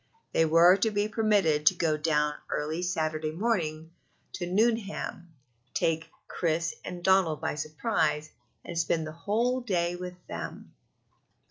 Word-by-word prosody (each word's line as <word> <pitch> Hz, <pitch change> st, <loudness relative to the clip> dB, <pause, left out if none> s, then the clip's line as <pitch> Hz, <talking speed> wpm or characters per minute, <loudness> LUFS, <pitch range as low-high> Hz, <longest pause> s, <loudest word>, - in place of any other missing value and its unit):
They 165 Hz, -, +4 dB
were 170 Hz, +4 st, +7 dB
to 220 Hz, +3 st, +2 dB
be 205 Hz, 0 st, 0 dB
permitted 200 Hz, -9 st, +2 dB
to 185 Hz, -, +7 dB
go 160 Hz, -3 st, +1 dB
down 150 Hz, -1 st, +1 dB, 0.2 s
early 155 Hz, +3 st, -2 dB
Saturday 155 Hz, -3 st, -1 dB
morning 165 Hz, -4 st, -1 dB, 0.4 s
to 175 Hz, -, -4 dB
Nuneham, 205 Hz, -3 st, -1 dB, 0.4 s
take 165 Hz, 0 st, 0 dB, 0.2 s
Chris 170 Hz, 0 st, -1 dB
and 175 Hz, -1 st, -7 dB
Donald 190 Hz, -5 st, +3 dB
by -, -, -2 dB
surprise, 155 Hz, 0 st, -1 dB, 0.3 s
and 170 Hz, -1 st, -3 dB
spend 160 Hz, -1 st, 0 dB
the 155 Hz, -, -6 dB
whole 230 Hz, +10 st, 0 dB
day 175 Hz, -7 st, 0 dB
with 180 Hz, 0 st, -6 dB
them. -, -, -7 dB
170 Hz, 135 wpm, -28 LUFS, 155-195 Hz, 0.4 s, were